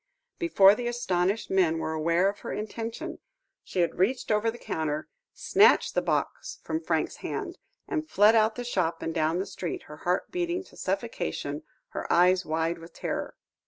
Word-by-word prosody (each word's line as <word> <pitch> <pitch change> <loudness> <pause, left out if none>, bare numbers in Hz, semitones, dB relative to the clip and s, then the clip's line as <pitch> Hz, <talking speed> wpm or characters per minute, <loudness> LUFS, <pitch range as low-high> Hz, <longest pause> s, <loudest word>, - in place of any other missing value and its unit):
Before 205 - +6
the 240 +3 -3
astonished 200 -4 0
men 180 -4 +3
were 160 0 -2
aware 170 +4 +2
of 200 +1 -2
her - - -6
intention, 230 +10 -5 0.4
she 185 - -1
had 170 0 -1
reached 245 +7 +1
over 215 +2 +2
the 230 - -5
counter, 155 -7 -3 0.2
snatched 425 +4 +4
the - - +2
box - - -2
from 320 - -2
Franks's - - -1
hand, 370 -5 -5 0.3
and 310 0 -2
fled 210 -2 +6
out 220 0 +4
of - - -18
the 245 - -3
shop 185 -8 -1
and 165 - -2
down 160 0 +1
the 190 - -1
street, 185 -3 -5
her 150 - -11
heart 180 +3 -1
beating 355 +1 -1
to - - -18
suffocation, - - -3 0.3
her - - -5
eyes 180 +1 +4
wide 165 +2 0
with 165 +1 -12
terror. - - -4
195 Hz, 180 wpm, -28 LUFS, 170-240 Hz, 0.4 s, Before